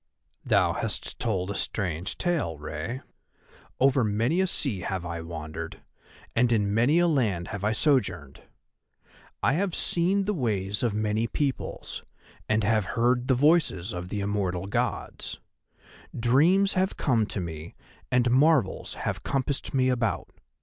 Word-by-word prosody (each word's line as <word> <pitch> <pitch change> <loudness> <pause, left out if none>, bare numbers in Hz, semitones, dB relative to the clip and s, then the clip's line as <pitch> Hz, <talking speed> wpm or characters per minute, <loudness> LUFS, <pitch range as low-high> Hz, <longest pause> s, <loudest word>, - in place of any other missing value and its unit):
"Thou - - +3
hast - - -3
told 100 -5 -1
a - - -4
strange 90 -2 -2
tale, 165 - 0
Rei. 75 - -5 0.8
Over 135 -1 +4
many 115 - +1
a 190 - +2
sea 135 - -1
have 90 0 -3
I 85 -1 -4
wandered, 80 -1 -7 0.5
and 120 0 +3
in 105 -3 +2
many 120 +9 +3
a 175 0 +4
land 110 - 0
I - - -7
have 105 +3 0
sojourned. 95 - 0 1.0
I 135 - +4
have 185 +2 0
seen 190 +3 +1
the 210 - 0
ways 105 - -1
of 115 -4 0
many 110 +1 0
peoples, 140 +3 -3 0.5
and 110 0 +2
have 110 -1 +2
heard 120 +1 +2
the 130 - +4
voices 130 - +2
of 90 0 -5
the 105 0 -2
immortal 95 -3 -1
Gods. 100 - -3 0.8
Dreams 165 +12 +4
have 190 +1 0
come 115 -6 +2
to 105 - -4
me 80 -2 -6 0.4
and 125 -1 +3
marvels 135 -5 +3
have - - -3
compassed 135 0 -2
me 130 -1 +2
about. 120 -4 -1
115 Hz, 145 wpm, -27 LUFS, 95-135 Hz, 1.0 s, Over